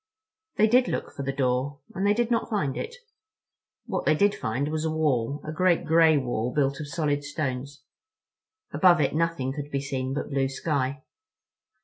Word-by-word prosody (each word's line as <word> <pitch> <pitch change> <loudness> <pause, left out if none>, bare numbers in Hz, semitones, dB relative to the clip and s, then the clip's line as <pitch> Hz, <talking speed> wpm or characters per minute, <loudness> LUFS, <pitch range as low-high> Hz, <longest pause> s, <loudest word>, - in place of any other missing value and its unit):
They 215 - +5
did 245 +3 +4
look - - -3
for - - -6
the 135 0 -1
door. 135 +1 0 0.2
And 195 0 0
they 205 - +4
did 240 +1 0
not 230 -1 +1
find 170 - -1
it. 475 - -5 0.9
What - - -2
they - - +3
did 200 +5 +3
find 135 - -2
was 155 0 -2
a 160 - 0
wall—a 150 -2 -1
great 175 +2 +2
gray 160 -1 +5
wall 120 -3 -1
built 140 0 0
of 150 - -5
solid 145 -2 -1
stones—above 155 - -2
it 145 - +1
nothing 160 -5 0
could 145 0 -6
be 140 - -1
seen 135 -1 -3
but 145 - -4
blue 135 -1 +1
sky. 135 -1 -2
145 Hz, 170 wpm, -26 LUFS, 135-170 Hz, 0.9 s, They